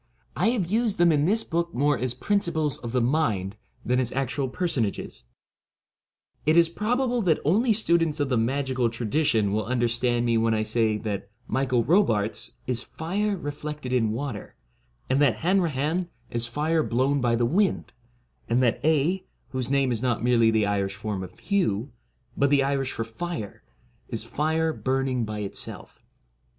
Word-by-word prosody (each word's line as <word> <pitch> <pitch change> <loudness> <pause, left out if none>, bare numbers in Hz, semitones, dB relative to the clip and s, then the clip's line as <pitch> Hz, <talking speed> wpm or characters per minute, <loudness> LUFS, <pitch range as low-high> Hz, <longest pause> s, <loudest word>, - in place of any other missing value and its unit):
I 175 - +2
have 230 -7 0
used 220 +3 0
them 175 -1 +5
in 150 -1 +2
this 220 +6 +3
book 170 0 -2
more 145 +3 +3
as 125 -1 -1
principles 160 -3 0
of 120 - -6
the 125 -1 +1
mind 115 -8 0 0.3
than 125 +1 +2
as 125 -2 0
actual 135 0 -1
personages. 125 - -2 1.2
It 155 +2 +3
is 170 -1 +6
probable 245 +6 0
that 170 -6 +3
only 220 - +3
students 170 -7 +2
of 145 -2 0
the 130 - +2
magical 130 +1 0
tradition 115 -2 0
will 110 +1 -1
under 120 -1 +1
stand 120 0 0
me 115 -1 +2
when 115 0 +2
I 110 - 0
say 110 0 +1
that 105 -2 -4
' 125 - -38
Michael 130 -3 +2
Robartes 115 - +1
' - - -38
is 125 -2 +1
fire 195 +9 -2
reflected 145 -3 -5
in 115 -4 +2
water, 115 -1 -5 0.5
and 135 +2 +2
that 135 -7 +4
Hanrahan 170 -2 +1 0.2
is 120 0 +1
fire 155 +6 +1
blown 135 +2 +1
by 120 -1 +2
the 120 0 +1
wind, 190 - +1 0.6
and 120 +2 +3
that 120 - +1
Aedh, 160 +5 +1 0.2
whose 130 -2 -3
name 135 -2 +2
is 115 -2 -1
not 120 -3 0
merely 120 -2 +4
the 110 -2 +2
Irish 100 -1 -1
form 105 -1 -4
of 90 0 -11
Hugh, 140 - 0 0.4
but 140 - +2
the 140 -1 +4
Irish 135 -1 0
for 115 - -2
fire, 115 - -6 0.5
is 115 -3 -2
fire 160 +6 0
burning 130 -3 -1
by 105 0 -4
itself. 100 - -6
130 Hz, 170 wpm, -26 LUFS, 115-160 Hz, 1.2 s, is